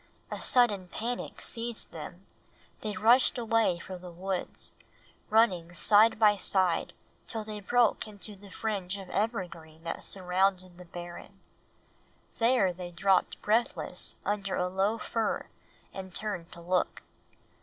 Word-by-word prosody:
A - - -3
sudden 210 -7 +3
panic 235 +6 -4
seized 230 0 -2
them; - - -9 0.6
they 210 -3 -3
rushed 235 +7 +5
away 225 -6 +2
for 185 +1 -8
the 180 0 -9
woods, 185 +2 -3 0.6
running 185 -7 +3
side 215 +4 +5
by 210 -1 +6
side 185 -3 +2 0.3
till 225 -2 -3
they 210 -1 -6
broke 230 +2 +2
into 210 0 -7
the 200 +1 -14
fringe 200 -2 -2
of 195 -2 -9
evergreen 175 -7 -3
that 165 - -4
surrounded 185 -1 0
the 180 - -10
barren. 175 +3 -9 1.0
There 230 -6 +4
they 175 0 -7
dropped 190 +2 +2
breathless 225 +3 +1
under 200 -1 -1
a 180 - +1
low 195 +4 +1
fir 225 -1 -1 0.5
and 190 -2 -7
turned 200 -6 -3
to 170 - -11
look. 180 +1 0
195 Hz, 135 wpm, -30 LUFS, 180-220 Hz, 1.0 s, by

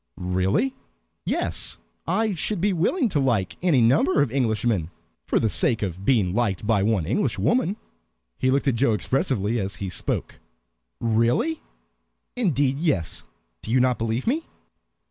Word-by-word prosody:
"Really?" 95 +8 0 0.5
"Yes - - -1 0.3
I 210 +5 +1
should 195 +3 -2
be 200 +3 +1
willing 240 - +1
to 155 - 0
like 115 -9 0
any 165 -8 +3
number 140 +6 +4
of 130 - -3
Englishmen 110 - 0 0.4
for - - +2
the 110 - +1
sake 120 - +2
of 95 -1 -4
being 100 -7 +2
liked 105 -3 0
by 105 -2 +2
one 100 -5 +1
Englishwoman." 205 - 0 0.6
He 130 - +2
looked 140 +2 +1
at 135 - +3
Joe 115 0 +2
expressively 115 -1 0
as 100 0 -3
he 95 - -5
spoke. 90 - -3 0.6
"Really?" 120 - +1 0.7
"Indeed, 145 - +1
yes. 145 - -1 0.4
Do - - -9
you 125 +3 +3
not 125 -1 +2
believe 115 +2 -1
me?" 305 +8 0
125 Hz, 145 wpm, -24 LUFS, 105-160 Hz, 0.7 s, number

